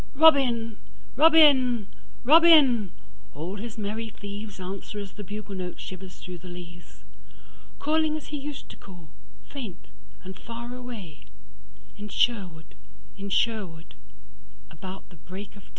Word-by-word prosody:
Robin! 255 -8 +5 0.4
Robin! 270 -7 +6 0.4
Robin! 280 - +7 0.4
All 170 +7 -5
his 225 +2 -7
merry 220 +2 -3
thievesAnswer 200 -1 -7
as 195 -2 -7
the 205 - -8
bugle 205 +1 -7
note 180 -2 -5
shivers 185 0 -8
through 180 -1 -8
the 180 - -12
leaves:Calling 180 - -5
as 310 - -10
he 295 - -3
used 285 0 -7
to - - -11
call, 175 -5 -13 0.4
faint 225 -11 -8 0.3
and 185 0 -9
far 235 +1 -7
away, 230 -11 -9 0.7
In 210 0 -7
Sherwood, 180 -9 0 0.4
in 200 0 -6
Sherwood, 185 -8 -1 0.8
about 185 +4 -9
the 180 - -16
break 185 +7 -9
of 200 - -13
day. - - -22
205 Hz, 125 wpm, -27 LUFS, 185-245 Hz, 0.8 s, Robin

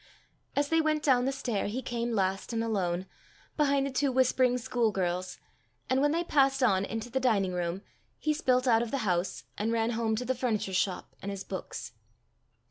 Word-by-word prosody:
As 285 0 +1
they 325 0 +4
went 310 -1 0
down 255 -3 +4
the 270 - +1
stair, 240 -7 -2
he 245 +6 -3
came 235 0 -2
last 195 +2 -1
and 225 0 0
alone, 185 -5 -1 0.5
behind 280 -2 +2
the 275 - -3
two 270 +1 +1
whispering 255 -1 +3
school 240 -2 0
girls; 185 -1 -2 0.5
and 260 +1 +3
when 290 +1 +3
they 335 +2 +1
passed 270 -4 +3
on 195 -5 +3
into 225 +3 -5
the 265 - +1
dining 205 -8 +2
room, 175 +2 -2 0.3
he 305 - 0
spilt 255 -4 +1
out 225 -2 +5
of 235 - -2
the 260 -3 -2
house, 180 -1 0 0.2
and 215 +2 0
ran 230 0 +1
home 225 -1 0
to 250 +3 -3
the 260 - +1
furniture 230 -6 -1
shop 185 0 -1
and 200 - -4
his 195 -1 -5
books. - - -6
235 Hz, 200 wpm, -29 LUFS, 200-265 Hz, 0.5 s, out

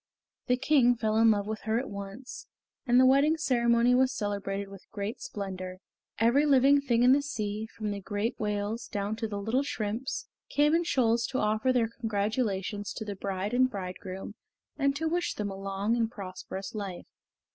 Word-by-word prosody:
The 250 -1 +3
King 260 -2 +4
fell 220 -2 0
in 225 0 +6
love 205 -2 +2
with 215 +1 -4
her 220 +1 +1
at 260 +3 -2
once, 200 +5 -8 0.4
and 245 +1 +5
the 260 - +7
wedding 280 +5 +5
ceremony 240 -4 +3
was 260 +1 +4
celebrated 200 -2 -3
with 195 -1 -13
great 205 +2 -5
splendor. 185 -2 -5 0.4
Every 235 +6 +4
living 280 +1 +5
thing 240 -4 +2
in 250 - +7
the 280 +2 +5
sea, 215 -6 -3
from 215 -1 -5
the 200 0 -4
great 205 +3 -2
whales 210 +2 -2
down 205 +1 -2
to 225 -1 -2
the 205 -1 -4
little 225 +6 +1
shrimps, 235 -1 -3 0.2
came 295 +1 +3
in 340 +1 +2
shoals 235 -6 +2
to 260 - -3
offer 215 +3 +2
their 245 -3 +2
congratulations 205 -2 -1
to 220 - -6
the 205 -1 -4
bride 195 +2 -3
and 255 +1 +4
bridegroom 190 -1 -6 0.4
and 280 -1 +1
to 320 +3 -1
wish 345 +2 -1
them 205 -1 -3
a - - -6
long 195 +3 -1
and 230 -2 +1
prosperous 190 -2 -7
life. 200 -5 -5
220 Hz, 185 wpm, -29 LUFS, 200-255 Hz, 0.4 s, the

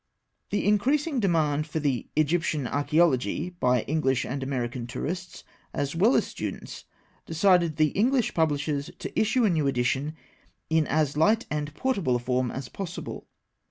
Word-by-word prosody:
The 205 - -1
increasing 275 +8 +2
demand 155 -6 +1
for 160 - -3
the 140 -5 -1
Egyptian 155 -2 +1
Archaeology 150 +3 +1
by 125 -9 +1
English 135 -4 0
and 135 +2 -4
American 125 -2 -3
tourists, 180 +8 -5 0.3
as 140 0 -2
well 210 +10 +4
as - - +3
students, - - -6 0.4
decided 170 -1 +3
the 155 -1 +3
English 245 - +1
publishers 150 -2 0
to - - -4
issue 220 +3 +3
a - - +4
new 155 -4 +1
edition 135 +3 0 0.6
in 160 -2 +3
as 150 -1 +1
light 220 +9 +3
and 150 0 -2
portable 195 - 0
a - - +3
form 125 +1 0
as 135 +1 -5
possible. 180 +2 -7
155 Hz, 150 wpm, -26 LUFS, 140-180 Hz, 0.6 s, well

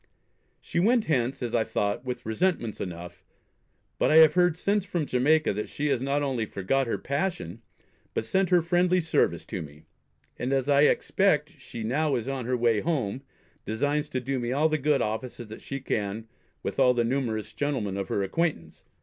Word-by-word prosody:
She 170 - -3
went 225 +5 +3
hence, 130 -3 0
as 120 - -3
I 115 - +3
thought, 100 +2 -2
with 125 -1 -5
resentments 115 - -1
enough; 90 -1 -7 0.8
but - - +3
I 155 - +4
have 160 -1 +8
heard 180 -2 +3
since 200 +2 +1
from 175 -5 -2
Jamaica, 145 +2 +2
that 105 +2 -4
she 150 0 -2
has 125 - +1
not 140 +2 0
only 125 -6 -1
forgot 125 +9 0
her - - -1
passion, 145 - -3 0.5
but - - -1
sent 190 +9 +1
her 175 -2 +4
friendly 180 +1 +2
service 160 -2 +1
to - - -5
me; 75 0 -11 0.6
and, 125 - -2
as 135 -1 0
I 145 0 +5
expect, 160 -5 +2
she 115 -3 -7
now 140 +5 +1
is 120 0 -3
on 135 -3 -3
her 125 +1 0
way 115 -2 +2
home, 130 -6 -1 0.4
designs 145 +7 -1
to 130 - -2
do 130 +1 -2
me 120 0 -2
all 150 +4 +2
the 155 0 0
good 145 0 +2
offices 110 +1 -4
that 110 - -9
she 140 - -5
can 110 -3 -3 0.4
with - - -4
all 125 -1 +5
the 120 - +2
numerous 115 -4 -2
gentlemen 130 -10 -2
of 100 -1 -3
her 100 - -1
acquaintance. 95 - -2
135 Hz, 190 wpm, -27 LUFS, 110-155 Hz, 0.8 s, have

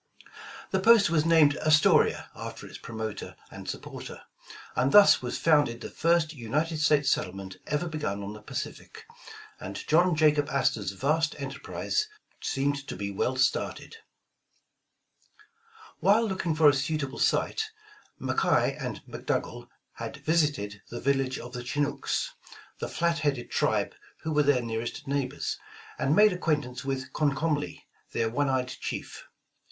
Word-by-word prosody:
The 190 - +2
post 215 -1 +6
was 155 -2 +2
named 155 -3 +5
"Astoria" 155 -1 +4
after - - -7
its - - -10
promoter 110 -2 -6 0.2
and - - -8
supporter, - - -7 0.5
and 130 +2 +2
thus 205 -1 +8
was 125 - -3
founded 145 -7 +3
the - - -7
first 165 -1 +2
United 150 +6 -2
States 150 -2 +3
settlement 95 0 -3
ever 150 +3 -1
begun 150 -11 -3
on 100 +1 -5
the 105 - -11
Pacific, - - -7 0.5
and - - -7
John 175 +2 +4
Jaxiob 150 -2 +3
Astor^s 105 -8 0
vast 155 +4 +1
enterprise 140 - -2 0.3
seemed 140 0 -1
to - - -5
be 100 +1 -4
well 125 +6 -1
started. 130 0 -1 2.0
While 205 +6 +4
looking 180 -5 -1
for 155 -1 +6
a 145 - +7
suitable 140 0 -2
site, 440 -1 +1 0.5
McKay 455 - +1
and - - -5
Mc - - -9
Dougal - - -2 0.3
had - - -6
visited 145 -11 +1
the 120 - -5
village 135 -1 +1
of 120 - -9
the 125 -1 -5
Chinooks, 145 - -1 0.5
the - - -3
flat 170 -1 0
headed 140 -5 -1
tribe - - +1 0.3
who 160 - -2
were 150 -1 +3
their 140 -4 +3
nearest 115 +6 -4
neighbors, 140 0 -2 0.4
and 140 +3 +2
made 210 +1 +6
acquaintance 145 -7 -1
with 135 -1 -4
Comcomly, 145 0 0 0.3
their 115 -1 0
one 145 +3 +1
eyed 130 -1 0
chief. - - -6
145 Hz, 140 wpm, -28 LUFS, 125-160 Hz, 2.0 s, thus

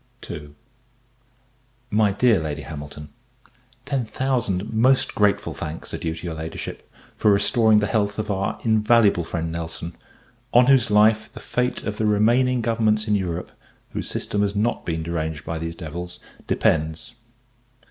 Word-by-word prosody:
MY 105 -1 +3
DEAR 115 -1 +4
LADY 75 -2 -4
HAMILTON, 75 0 -8 0.8
Ten 135 -2 -1
thousand 115 -6 -1
most 130 +4 +3
grateful 105 -1 +1
thanks 80 +2 -6
are - - -3
due 80 -1 -3
to 80 - -9
your 85 - -3
Ladyship, 80 +1 -7 0.2
for 105 - +3
restoring 110 +2 +4
the 105 - +3
health 105 -1 0
of 110 -1 -2
our 95 +1 -1
invaluable 110 -4 +4
friend 80 0 -3
Nelson, 85 0 -5 0.6
on 120 +1 +8
whose 130 -3 +4
life 105 +1 +4
the - - -9
fate 125 0 -1
of 105 -1 -4
the 110 - +1
remaining 120 +4 +3
governments 110 -1 +1
in 105 - +2
Europe, 90 -3 -2 0.4
whose - - -4
system 105 - -1
has 100 0 0
not 110 +4 -1
been 80 -1 -2
deranged 80 -2 -3
by 80 -1 -3
these 85 +1 -4
devils, 90 +2 -7 0.3
depends. 80 +8 0
105 Hz, 145 wpm, -23 LUFS, 85-110 Hz, 0.8 s, on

